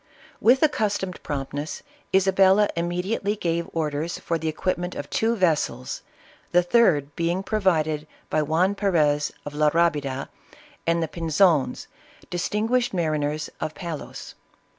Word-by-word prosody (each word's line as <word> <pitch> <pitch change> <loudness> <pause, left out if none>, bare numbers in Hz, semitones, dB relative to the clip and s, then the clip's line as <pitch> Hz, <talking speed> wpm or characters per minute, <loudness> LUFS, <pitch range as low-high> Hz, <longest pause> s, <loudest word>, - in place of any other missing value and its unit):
"With 255 +5 +5
accustomed 205 -10 0
promptness, 145 +1 -4 0.3
Isabella 190 +1 +4
immediately 180 +5 -1
gave 170 -4 -2
orders 155 0 -2
for 165 -1 -2
the 160 - -3
equipment 175 +3 -2
of 145 - -5
two 225 +1 +1
ves 175 -7 +3
sels, 125 +1 -5 0.5
the 175 0 +5
third 165 - +3
being 170 +3 0
provided 160 -8 +1 0.2
by 155 - +1
Juan 165 +6 +2
Perez 155 -8 +2
of 145 - -6
La 150 0 +3
Rabida, 145 -5 0 0.6
and 170 0 +2
the - - -1
Pinzons, 165 -2 +2 0.5
distinguished 215 +6 0
mariners 155 -3 -1
of 155 - -4
Pa 170 -3 -5
los. 150 - -8
170 Hz, 130 wpm, -24 LUFS, 150-190 Hz, 0.6 s, With